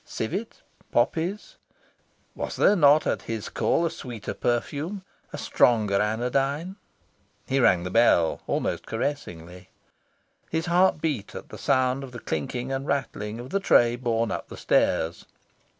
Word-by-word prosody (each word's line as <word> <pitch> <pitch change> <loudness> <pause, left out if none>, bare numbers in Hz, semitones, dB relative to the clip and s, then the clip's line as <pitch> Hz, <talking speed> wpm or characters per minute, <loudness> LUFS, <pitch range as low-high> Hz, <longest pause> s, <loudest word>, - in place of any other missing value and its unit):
Civet, 190 - -5 0.3
poppies? 180 +6 -1 0.8
Was - - -5
there 205 - +4
not, 150 -3 +5
at - - 0
his 110 -2 -5
call, 170 - +1
a 165 - -1
sweeter 120 -5 -6
perfume, 145 - -2 0.3
a - - -6
stronger 105 -5 +2
anodyne? 135 - -1 0.7
He 135 - 0
rang 90 -8 +4
the 90 - -4
bell, 105 -8 +3
almost - - -2
caressingly. 90 - -5 0.8
His 160 +1 -1
heart 175 -2 +3
beat 145 -11 -2
at - - -8
sound 130 0 +1
of 130 -2 -9
the 120 - -7
clinking 120 - -3
and 135 +1 -3
rattling 115 -6 -2
of 125 +2 -8
the 200 - +1
tray 120 -11 +4
borne 115 -2 -1
up - - -4
the - - -9
stairs. 80 +1 +1
125 Hz, 140 wpm, -26 LUFS, 110-150 Hz, 0.8 s, not